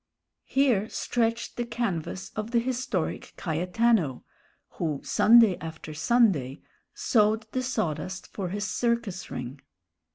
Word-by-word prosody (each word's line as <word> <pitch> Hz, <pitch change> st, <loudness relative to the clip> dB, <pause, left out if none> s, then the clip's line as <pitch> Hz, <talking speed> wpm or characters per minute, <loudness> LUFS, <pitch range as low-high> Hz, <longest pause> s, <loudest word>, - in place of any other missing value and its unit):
Here 245 Hz, -7 st, +2 dB
stretched 230 Hz, -1 st, -1 dB
the 240 Hz, -, 0 dB
canvas 210 Hz, -7 st, -3 dB
of 215 Hz, +1 st, -3 dB
the 240 Hz, -, +1 dB
historic 255 Hz, +2 st, -2 dB
Cayetano, 180 Hz, -, +1 dB, 0.6 s
who 155 Hz, -5 st, -1 dB
Sunday 225 Hz, -5 st, +6 dB
after 160 Hz, -1 st, -7 dB
Sunday 160 Hz, -, +2 dB, 0.3 s
sowed 220 Hz, -1 st, +2 dB
the 255 Hz, -, -1 dB
sawdust 190 Hz, -, -2 dB
for 190 Hz, -3 st, -5 dB
his 205 Hz, +2 st, -3 dB
circus 235 Hz, -2 st, -1 dB
ring. 125 Hz, +2 st, -6 dB
210 Hz, 110 wpm, -27 LUFS, 165-235 Hz, 0.6 s, Sunday